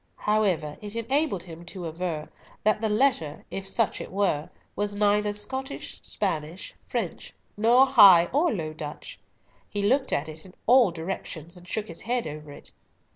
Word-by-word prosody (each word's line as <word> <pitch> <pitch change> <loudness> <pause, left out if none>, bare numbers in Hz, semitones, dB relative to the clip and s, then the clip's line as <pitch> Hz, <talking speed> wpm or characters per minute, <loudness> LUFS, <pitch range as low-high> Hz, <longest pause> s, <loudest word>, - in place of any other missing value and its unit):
However, 190 -8 0
it 210 +1 -7
enabled 230 - 0
him 170 -1 -10
to 175 0 -7
aver 165 -1 -3 0.4
that 215 0 +2
the 220 - +1
letter—if 195 - 0
such 225 +1 0
it - - -8
were—was 200 +2 -2
neither 210 0 +2
Scottish, 265 +7 -5
French, 170 -3 -3 0.2
Spanish, - - -4 0.2
nor 235 +5 +5
High 200 -10 +8
or 315 +4 +3
Low 155 -5 -3
Dutch. 150 -1 -8 0.5
He 205 -1 -2
looked 260 +6 +2
at 145 - 0
it 155 0 -9
in 185 -1 -15
all 245 -3 +6
directions, 170 -1 -6
and 180 0 -13
shook 215 +2 -3
his 165 - -7
head 245 +1 -1
over 150 -1 -7
it. - - -12
200 Hz, 155 wpm, -26 LUFS, 165-220 Hz, 0.5 s, High